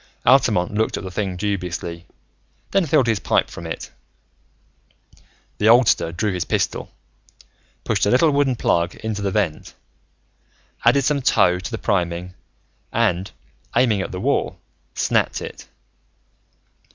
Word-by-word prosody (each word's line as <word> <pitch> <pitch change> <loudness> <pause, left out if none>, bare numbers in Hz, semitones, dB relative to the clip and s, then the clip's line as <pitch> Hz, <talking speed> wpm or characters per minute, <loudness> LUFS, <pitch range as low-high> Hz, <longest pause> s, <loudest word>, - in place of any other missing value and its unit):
Altamont 90 +3 +4
looked 110 +1 0
at - - -6
the 95 - -6
thing 95 -2 -3
dubiously, 90 -3 -4 0.6
then 195 -4 +2
filled 145 -3 +3
his 115 -3 +1
pipe - - +1
from 85 - -8
it. 80 - -6 1.7
The 105 - +4
oldster 115 -8 +4
drew 95 +4 -1
his 90 - -1
pistol, - - -2 0.9
pushed - - +1
a - - +3
little 150 +7 +4
wooden 140 -2 +2
plug 85 -6 0
into 110 -2 -4
the 100 - 0
vent, 95 -6 -2 1.1
added 140 - +4
some 145 +1 +1
tow 90 -7 +3
to 95 - -6
the 115 - -4
priming, 90 -4 -1 0.6
and, 100 -5 0 0.5
aiming 110 -6 +3
at - - -5
the 90 - -5
wall, - - 0 0.4
snapped - - +1
it. - - -9
100 Hz, 135 wpm, -21 LUFS, 90-115 Hz, 1.7 s, Altamont